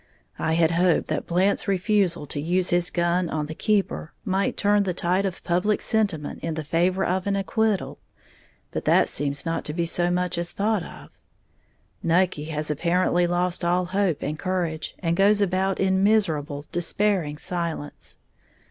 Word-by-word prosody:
I 160 - 0
had 165 0 +3
hoped 175 0 +2
that - - -2
Blant's 185 +5 +1
refusal 195 -4 +1
to 145 0 -4
use 180 +4 +1
his 175 0 +2
gun 175 0 0
on 155 -1 -2
the 155 - -6
keeper 200 -3 -1
might 190 +1 0
turn 205 0 +3
the 185 -3 -1
tide 185 +3 +1
of 185 - -7
public 180 +5 +1
sentiment 200 -9 -1
in 165 -1 -3
favor 170 +5 0
of 185 +2 -1
an 200 - +1
acquittal; 210 +1 0 0.7
but - - -4
that - - +4
seems 140 0 -2
not 165 0 -1
to 150 - -3
be 170 +1 0
so 175 +1 +1
much 180 -1 0
as 175 0 -3
thought 210 0 +1
of. - - -11 0.9
Nucky 170 -2 +1
has 155 -1 -3
apparently 175 +3 +2
lost 175 0 -1
all 180 +1 +2
hope 185 -4 0
and 150 +1 -3
courage, 175 -4 -2
and 170 -2 -1
goes 200 +3 +4
about 190 -1 +1
in 190 0 +2
miserable, 155 -9 +1
despairing 175 -3 0
silence. 170 -4 -4
175 Hz, 165 wpm, -24 LUFS, 165-195 Hz, 0.9 s, that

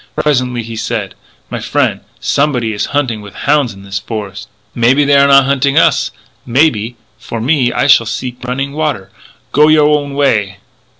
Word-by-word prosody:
Presently 125 -5 0
he 115 0 -8
said: 110 -3 -3 0.4
"My - - -3
frien', - - -1 0.2
somebody 125 -6 0
is 105 0 -2
hunting 130 -7 -1
with 100 -1 -12
houn's 145 -4 +1
in 100 -1 -13
this 100 0 -4
fores'. 100 -2 -7 0.3
"Maybe 125 +5 +3
they 140 0 +3
are 140 0 +5
not 135 -1 +6
hunting 140 0 +1
us.... - - +3 0.3
Maybe.... 120 -3 +1 0.2
But, - - -24
for 115 - -5
me, 125 0 +1
I - - 0
shall 115 -5 +5
seek 125 +2 -5
running 135 +3 -3
water. 145 -11 -3 0.4
Go 150 +1 +4
you 155 - +5
your 150 0 +4
own 140 -1 -7
way! 105 -9 +1
125 Hz, 180 wpm, -14 LUFS, 110-140 Hz, 0.4 s, not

